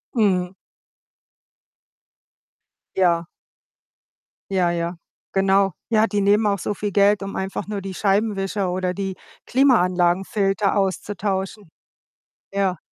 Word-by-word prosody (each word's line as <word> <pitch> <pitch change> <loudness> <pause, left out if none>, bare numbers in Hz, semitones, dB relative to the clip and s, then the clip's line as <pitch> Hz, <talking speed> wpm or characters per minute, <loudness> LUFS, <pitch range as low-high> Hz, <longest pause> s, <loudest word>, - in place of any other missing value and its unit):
Mhm. 185 -5 +2 2.4
Ja. 175 -2 +2 1.3
Ja, 185 -2 +2
ja, 170 +1 -2 0.4
genau. 195 0 +3 0.2
Ja, 220 0 +4
die 205 -2 -1
nehmen 205 +2 +3
auch 200 -1 +1
so 205 - -3
viel 205 0 -3
Geld, 200 +1 +4
um 195 0 -5
einfach 190 0 -4
nur 205 -1 -4
die 195 0 -6
Scheibenwischer 195 -1 0
oder 180 0 -1
die 195 0 -3 0.3
Klimaanlagenfilter 195 -4 +2
auszutauschen. 195 0 -2 0.8
Ja. 195 -2 0
195 Hz, 100 wpm, -22 LUFS, 185-205 Hz, 2.4 s, Ja